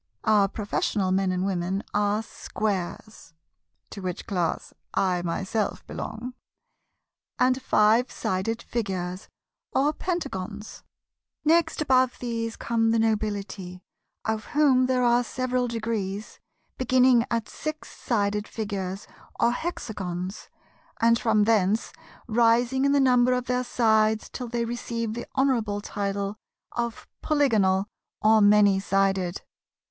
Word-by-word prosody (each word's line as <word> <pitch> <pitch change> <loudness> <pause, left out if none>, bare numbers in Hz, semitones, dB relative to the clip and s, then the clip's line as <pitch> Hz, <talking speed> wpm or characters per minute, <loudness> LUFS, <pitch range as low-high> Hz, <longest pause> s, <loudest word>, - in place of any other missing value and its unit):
Our 210 -3 +4
Professional 200 -1 -1
Men 190 0 +2
and 185 0 -1
Gentlemen 190 0 -1
are 205 +1 +1
Squares 205 -4 -4 0.6
(to 200 - -7
which 180 -2 -4
class 175 -5 -2 0.2
I 180 -2 +1
myself 190 +5 -2
belong) 230 +3 -6 1.0
and 255 +1 +2
Five 225 +1 +3
Sided 195 +5 -2
Figures 185 -4 -3 0.5
or 290 +3 +2
Pentagons. 220 - -4 0.6
Next 320 0 +3
above 255 -3 +3
these 230 -2 -3
come 225 -1 0
the 230 - +3
Nobility, 205 -4 -2 0.4
of 220 -1 -1
whom 260 -4 +5
there 255 -1 +1
are 240 0 +4
several 255 0 -1
degrees, 215 -3 -4 0.4
beginning 255 -1 +4
at 230 -1 -1
Six 310 0 -6
Sided 210 -2 -1
Figures, 200 -3 -4 0.3
or 235 - +4
Hexagons, 195 - -5 0.5
and 230 0 +4
from 220 -2 +3
thence 215 0 +2 0.3
rising 240 +3 +3
in 280 - +3
the 285 - +4
number 250 -2 +4
of 250 0 -1
their 250 0 0
sides 220 -3 +2
till 250 - -6
they 235 0 -1
receive 230 -1 -3
the 235 - -6
honourable 235 -7 +1
title 200 0 -3 0.3
of 235 -1 -4
Polygonal, 215 - +2 0.3
or 215 0 +5
many 205 -1 +5
Sided. 195 -2 0
220 Hz, 120 wpm, -26 LUFS, 195-245 Hz, 1.0 s, whom